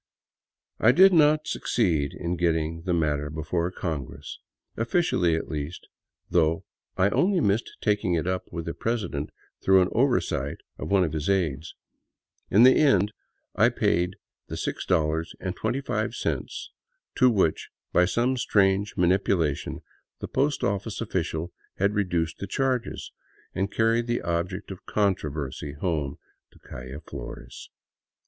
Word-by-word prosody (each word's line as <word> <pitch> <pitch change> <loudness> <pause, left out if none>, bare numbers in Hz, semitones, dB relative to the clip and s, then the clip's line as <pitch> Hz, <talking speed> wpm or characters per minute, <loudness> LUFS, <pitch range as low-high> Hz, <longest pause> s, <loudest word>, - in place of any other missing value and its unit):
I 120 - +6
did 190 +5 +7
not 155 -1 +5
succeed 80 - 0
in 85 +1 -2
getting 80 -1 0
the 90 - +1
matter 75 -3 0
before 80 +3 -2
Congress 80 -8 -5 0.2
— - - -55
officially, 115 - +1
at 80 - -3
least 75 +2 -5 0.2
— - - -53
though 80 -1 +2 0.3
I 95 +2 +4
only 185 - +3
missed 105 -4 0
taking 105 -4 +1
it 80 - -1
up 95 0 -3
with 85 -1 -5
the 85 - -3
president 105 -11 -2 0.3
through 95 0 +5
an 90 - -1
oversight 115 - +1 0.2
of - - -5
one 100 -2 +4
of 80 -3 -2
his 80 +3 -2
aids. 85 -6 0 0.7
In 105 +4 +6
the 130 +1 +7
end 105 -9 +4 0.4
I - - +5
paid 90 +2 +1 0.3
the - - -6
$6.25 90 - -2 0.5
to 130 -2 +6
which, 95 -8 +1 0.2
by 90 - +5
some 120 +7 +1
strange 100 -3 +2
manipulation, 90 -4 +1 0.4
the - - -6
post 145 +1 0
office 100 +2 -1
official 85 -5 -2 0.2
had 100 +2 +2
reduced 85 -5 -1
the 100 - -4
charges, 130 +3 -1 0.4
and 95 +1 -1
carried 115 +1 +2
the 120 0 -1
object 85 +2 -2
of 95 - -9
controversy 75 -8 -1
home 75 -4 -2 0.3
to - - -22
the - - -22
calle 65 +4 -8
Flores. - - -9
90 Hz, 140 wpm, -26 LUFS, 80-110 Hz, 0.7 s, did